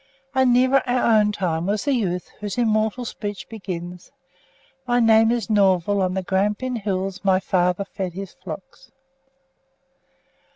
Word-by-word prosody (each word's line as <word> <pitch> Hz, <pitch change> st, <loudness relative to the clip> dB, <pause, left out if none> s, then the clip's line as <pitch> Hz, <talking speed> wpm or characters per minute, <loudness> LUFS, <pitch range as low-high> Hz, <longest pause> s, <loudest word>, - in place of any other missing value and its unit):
And 260 Hz, -1 st, +3 dB
nearer 255 Hz, +2 st, +4 dB
our 245 Hz, -3 st, +3 dB
own 210 Hz, 0 st, +2 dB
time 175 Hz, -4 st, -2 dB
was 205 Hz, +5 st, -1 dB
the 285 Hz, -, +2 dB
youth 180 Hz, -8 st, -2 dB
whose 210 Hz, 0 st, -5 dB
immortal 220 Hz, +1 st, +1 dB
speech 205 Hz, -3 st, -6 dB
begins, 180 Hz, -4 st, -7 dB, 0.8 s
"My 245 Hz, 0 st, +2 dB
name 225 Hz, -1 st, +5 dB
is 235 Hz, -4 st, 0 dB
Norval; 200 Hz, -2 st, +2 dB
on 185 Hz, 0 st, 0 dB
the 190 Hz, -, -2 dB
Grampian 210 Hz, +7 st, -1 dB
Hills 195 Hz, -2 st, -3 dB
my 190 Hz, -1 st, +3 dB
father 180 Hz, 0 st, 0 dB
fed 190 Hz, -2 st, -5 dB
his 195 Hz, 0 st, -7 dB
flocks." 180 Hz, 0 st, -10 dB
205 Hz, 140 wpm, -22 LUFS, 185-225 Hz, 0.8 s, name